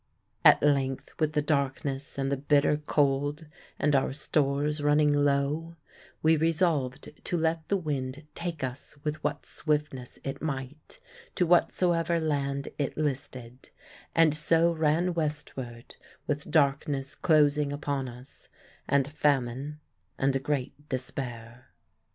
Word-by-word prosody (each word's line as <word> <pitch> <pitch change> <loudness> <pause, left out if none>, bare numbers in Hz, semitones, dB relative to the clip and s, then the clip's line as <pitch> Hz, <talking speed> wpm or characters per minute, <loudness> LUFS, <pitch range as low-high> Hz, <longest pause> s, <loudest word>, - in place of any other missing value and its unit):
At - - +7
length, 135 -2 +1
with 155 -1 +1
the 150 - +1
darkness 140 -1 -1
and 135 0 -1
the - - +2
bitter 145 +1 +3
cold 145 +2 +1 0.3
and 150 -1 +2
our 135 0 +1
stores 145 +1 0
running 145 0 +4
low, 145 +3 +1 0.5
we 160 +1 +5
resolved 160 -5 0
to 175 - -1
let 160 0 0
the 200 - +2
wind 145 -4 -4
take 170 -4 -4
us 130 +3 -6
with 155 0 -3
what - - -2
swiftness 150 -5 -2
it 135 - -5
might 145 - -5 0.4
to 180 - +2
whatsoever 170 -1 +2
land 140 -3 -1
it 140 - -2
listed; 130 -4 -4 0.5
and 165 -2 +5
so 165 +2 +3
ran 165 +2 +1
westward, 145 -7 -4 0.3
with 150 -1 -3
darkness 140 -2 +1
closing 150 -3 +3
upon 140 -2 -2
us, 125 +2 -13 0.4
and 140 -1 +2
famine 145 0 0 0.4
and 135 0 +1
a - - +2
great 145 +1 -3
despair. 125 -2 -5
145 Hz, 125 wpm, -28 LUFS, 135-155 Hz, 0.5 s, At